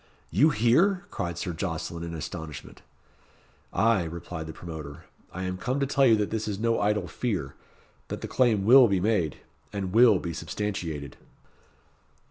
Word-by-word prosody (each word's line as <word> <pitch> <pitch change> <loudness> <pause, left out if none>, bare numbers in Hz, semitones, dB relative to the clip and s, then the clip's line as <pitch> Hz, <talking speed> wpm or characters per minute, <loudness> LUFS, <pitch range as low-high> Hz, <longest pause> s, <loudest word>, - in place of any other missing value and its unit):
"You 155 - +5
here?" 170 - +3
cried 85 -3 -3
Sir 85 0 -3
Jocelyn, 85 -1 -4
in 85 -1 -5
astonishment. 80 -2 -7 0.9
"Ay," 110 -2 +3
replied 80 0 -6
the - - -5
promoter; 80 -3 -8 0.3
"I 90 - -5
am 95 0 -3
come 130 +7 -1
to 140 - +1
tell 135 0 +3
you 115 - +6
that 105 -1 -1
this 110 -1 -2
is 100 -2 -2
no 115 +2 +1
idle 105 -2 +1
fear, 90 - -3 0.5
that - - -5
the - - -4
claim 110 -6 +2
will 125 +2 +8
be 100 -3 +1
made, 90 -6 0 0.3
and 95 -3 -4
will 120 +2 +7
be 85 -2 -4
substantiated." 80 -5 -4
95 Hz, 160 wpm, -27 LUFS, 85-115 Hz, 0.9 s, will